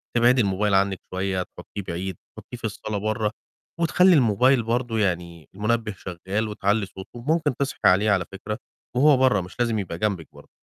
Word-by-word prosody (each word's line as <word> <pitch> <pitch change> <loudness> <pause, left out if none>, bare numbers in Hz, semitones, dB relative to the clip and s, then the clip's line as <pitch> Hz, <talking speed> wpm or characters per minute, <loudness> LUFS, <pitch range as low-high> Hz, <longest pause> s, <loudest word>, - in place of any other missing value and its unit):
تبعدي 120 +1 +5
الموبايل 100 0 +1
عنِّك 95 -1 +2
شوية، 95 0 -1
تحطّيه 100 - -9
بعيد، 90 +2 -3 0.2
تحطّيه 120 - -9
في - - -20
الصالة 105 0 -3
برّه 110 +1 -1 0.5
وتخلّي 180 +2 +5
الموبايل 125 0 +4
برضه 115 -1 -1
يعني 85 -5 -2
المنبه 110 +1 0
شغّال 95 +5 -3
وتعلّي 105 0 0
صوته 95 0 -11
وممكن 150 0 0
تصحي 140 0 -3
عليه 100 +3 +5
على 95 -3 +2
فكرة، 105 +2 -5 0.4
وهو 140 +1 +5
برّه 125 -7 +3
مش 90 +3 -10
لازم 115 -3 +1
يبقى 90 -4 -4
جنبِك 95 -4 -1
برضه. - - -15
105 Hz, 170 wpm, -24 LUFS, 95-120 Hz, 0.5 s, تبعدي